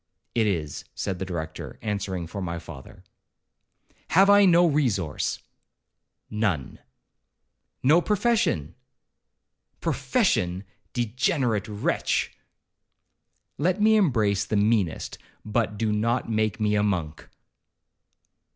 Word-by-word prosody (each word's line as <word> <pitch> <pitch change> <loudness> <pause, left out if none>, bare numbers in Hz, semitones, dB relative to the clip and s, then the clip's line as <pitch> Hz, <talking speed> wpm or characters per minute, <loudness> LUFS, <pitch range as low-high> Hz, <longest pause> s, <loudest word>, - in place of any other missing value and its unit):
'It 115 -2 +2
is,' 80 -7 -2
said 95 -3 -3
the 95 - -3
Director, 80 -3 -6
answering 100 -4 -3
for 100 +5 -6
my 85 -2 -3
father. 75 -5 -11 1.0
'Have 195 +3 +5
I 205 0 +7
no 175 -1 +6
resource?' 120 - 0 0.9
'None.' 105 - -1 1.0
'No 155 +7 +5
profession?' 205 - +1 1.1
'Profession! 90 +2 0 0.3
degenerate 125 - 0
wretch!' 105 -1 -1 1.2
'Let 180 +6 +1
me 220 +1 +5
embrace 110 - +2
the 110 - -3
meanest, 100 -5 0 0.3
but 105 -1 -1
do 110 0 0
not 115 +4 0
make 110 -1 0
me 105 -1 +1
a 105 - +2
monk.' 85 -7 -2
105 Hz, 100 wpm, -25 LUFS, 95-130 Hz, 1.2 s, I